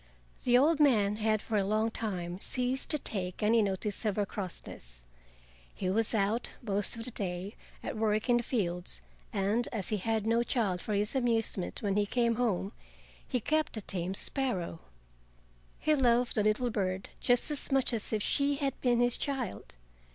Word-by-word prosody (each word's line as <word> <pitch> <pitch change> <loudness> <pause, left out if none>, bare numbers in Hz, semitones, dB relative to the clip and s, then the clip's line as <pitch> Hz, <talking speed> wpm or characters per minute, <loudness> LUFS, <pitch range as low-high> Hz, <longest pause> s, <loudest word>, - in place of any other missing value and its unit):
The 245 0 +6
old 300 +4 +4
man 210 -8 +4
had 215 -1 +1
for 220 - -1
a 200 - +2
long 215 +3 +1
time 180 -6 -3
ceased 250 +4 -1
to 305 - +5
take 190 -8 -2
any 225 +2 +4
notice 205 +1 -1
of 210 -3 0
her 205 - +1
crossness. 60 - -8 0.7
He 185 - -1
was 225 +3 +3
out 215 +3 0
most 205 -1 +1
of 225 - -5
the 250 - -4
day 190 0 -4 0.3
at - - -4
work 215 0 +1
in 240 -1 +5
the - - +1
fields, 180 - -2 0.3
and 205 +5 +1
as 210 -6 -3
he 215 - 0
had 220 +2 -1
no 230 +1 +3
child, 210 -7 0
for 210 - -2
his 210 +5 0
amusement 225 -8 0
when 200 -1 +1
he 205 0 +2
came 235 0 +1
home, 205 -5 0 0.6
he 250 - 0
kept 310 +1 0
a - - -3
tame 185 -1 -3
sparrow. 195 - -1 1.0
He 310 - +2
loved 245 -3 +3
the 215 - +1
little 215 +3 +1
bird 190 -2 -2
just 245 +4 +2
as 290 - -2
much 270 -2 +2
as 220 -3 -1
if 215 -2 0
she 285 0 +2
had 275 -2 -2
been 240 -2 +3
his 245 0 +3
child. 265 - -3
215 Hz, 180 wpm, -31 LUFS, 195-245 Hz, 1.0 s, The